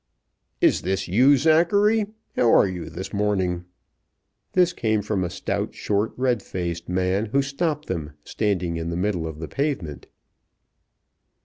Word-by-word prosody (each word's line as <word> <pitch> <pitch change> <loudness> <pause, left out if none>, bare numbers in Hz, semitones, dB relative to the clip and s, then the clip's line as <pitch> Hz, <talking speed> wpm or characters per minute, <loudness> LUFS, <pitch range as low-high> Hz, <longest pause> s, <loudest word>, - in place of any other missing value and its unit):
"Is - - +4
this 95 +1 -1
you, 130 +10 +5
Zachary? 200 - +3 0.3
How 120 -2 +4
are - - +6
you 90 -2 -5
this 95 +2 -7
morning?" 95 -4 0 0.9
This 180 -1 +3
came 110 -7 0
from 100 -2 -1
a 90 - -2
stout, 100 +3 -3
short, 105 +1 0
red 125 -4 +1
faced 85 -3 -4
man, 95 +4 0
who 140 +6 +1
stopped 150 +2 -2
them, 80 -5 -4
standing 90 -6 -1
in 80 0 -3
the 85 - -3
middle 90 -3 -1
of 80 -2 -7
the 80 0 -6
pavement. 135 - -3
100 Hz, 145 wpm, -24 LUFS, 90-135 Hz, 0.9 s, are